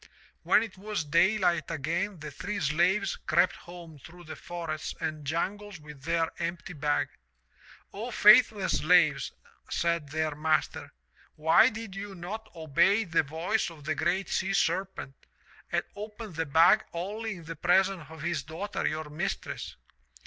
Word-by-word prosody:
'*When 215 - +4
it 190 -4 -9
was 210 -3 -3
daylight 175 +1 +2
again 170 +4 -2
the 150 -1 -6
three 205 +2 -4
slaves 170 +6 +1
crept 175 +3 +3
home 170 -3 -12
through 175 +6 -13
the 155 - -8
forests 165 -3 -5
and 155 -2 -3
jungles 195 +4 -3
with 150 -2 -12
their 165 0 +1
empty 170 +2 -4
bag. 150 -1 0 0.5
'* - - -24
*0, 220 +5 -5
faithless 215 -2 +6
slaves/ 155 -4 +4 0.4
said 170 -3 0
their 155 0 -1
master, 155 +1 -1 0.4
*why 160 +2 +5
did 215 -2 -8
you 195 0 -6
not 195 +6 -7
obey 170 +7 +3
the 170 -5 +2
voice 165 +9 -1
of 160 -3 -13
the 155 +2 -1
GREAT 180 +6 0
SEA 190 +1 -1
SERPENT 175 -4 -1 0.6
and - - +1
open 210 -1 -8
the 165 -1 -2
bag 165 +9 +5
only 205 +5 -4
in 170 - -11
the 165 +1 -7
presence 180 +1 +2
of 160 -1 -10
his 170 -4 -1
daughter, 160 +8 -4
your 155 0 -3
mistress? 175 +6 -4
170 Hz, 150 wpm, -29 LUFS, 155-195 Hz, 0.6 s, faithless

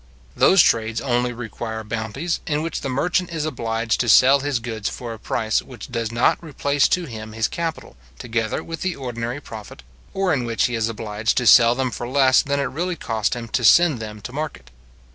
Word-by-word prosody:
Those 190 -2 +6
trades 110 0 +1
only 125 -2 0
require 115 -1 -6
bounties, 110 +9 -3
in 150 -1 0
which 165 -1 -4
the 135 - -3
merchant 175 +7 0
is 160 -2 -2
obliged 115 -5 -1
to 120 - +1
sell 130 +6 +7
his 140 -1 -1
goods 115 -3 -4
for 120 -2 -6
a 110 - -10
price 110 -1 0
which 125 -1 -11
does 115 -2 -2
not 120 +7 +2
replace 145 -2 +1
to 180 -1 0
him 110 -4 -8
his 110 0 0
capital, 165 - -5 0.2
together 115 -2 -2
with 165 0 -7
the 185 -2 -1
ordinary 120 0 -4
profit, 110 - -10 0.3
or 195 -3 +1
in 130 -4 0
which 115 -1 0
he 120 - -1
is 115 -1 0
obliged 110 0 -2
to 125 - +1
sell 115 +1 +7
them 130 -1 -1
for 120 - -5
less 130 0 +4
than 140 0 -1
it - - +1
really 170 +7 -2
cost 110 -8 -1
him 120 -1 -6
to 125 - -1
send 155 +3 +5
them 105 -1 -7
to 125 - -8
market. 145 - -6
120 Hz, 205 wpm, -22 LUFS, 115-145 Hz, 0.3 s, sell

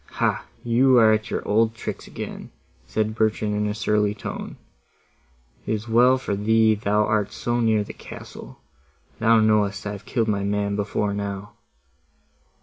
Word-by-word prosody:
"Hah! - - 0 0.2
you 125 +2 +4
are 110 -2 +6
at 110 0 -1
your - - -3
old 110 +2 +2
tricks - - -6
again," - - -7 0.4
said 110 0 -1
Bertrand 110 -1 0
in 105 0 0
a 105 - -2
surly 105 0 +1
tone. - - -7 1.1
"It - - 0
is 110 +2 -7
well 125 +3 +5
for 115 -6 -3
thee 110 +2 +3
thou 105 0 +1
art 105 -2 0
so 120 0 -2
near 110 -3 +2
the - - -9
castle; - - -11 0.6
thou 115 0 +5
knowest 105 -1 +2
I 100 - -2
have 105 0 -8
killed 115 -1 -1
my 100 -2 0
man 100 0 -1
before 105 0 -1
now." 100 0 -5
105 Hz, 160 wpm, -23 LUFS, 105-110 Hz, 1.1 s, are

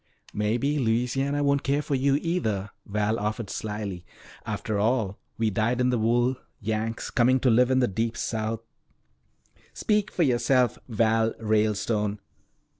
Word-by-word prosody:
"Maybe 120 +8 0
Louisiana 130 +4 0
won't 140 0 +2
care 140 +2 0
for 145 - -3
you 135 +1 +2
either," 110 - -1 0.2
Val 105 +2 0
offered 105 0 -3
slyly. 105 -4 -4 0.4
"After 105 -2 -2
all, 110 -3 0 0.2
we 110 -1 +1
dyed 115 +5 0
in 125 0 +3
the 120 - +1
wool 120 +3 +2 0.2
Yanks 110 +2 -3
coming 130 +1 +3
to 130 - +4
live 125 +2 +4
in 130 0 +3
the 125 - +3
deep 115 +3 -2
South 110 -1 -2 0.6
" - - -44 0.3
"Speak 210 -2 +1
for 175 - 0
yourself, 125 -2 +2
Val 115 -1 +2
Ralestone." 105 -1 +1
115 Hz, 145 wpm, -26 LUFS, 110-130 Hz, 0.6 s, to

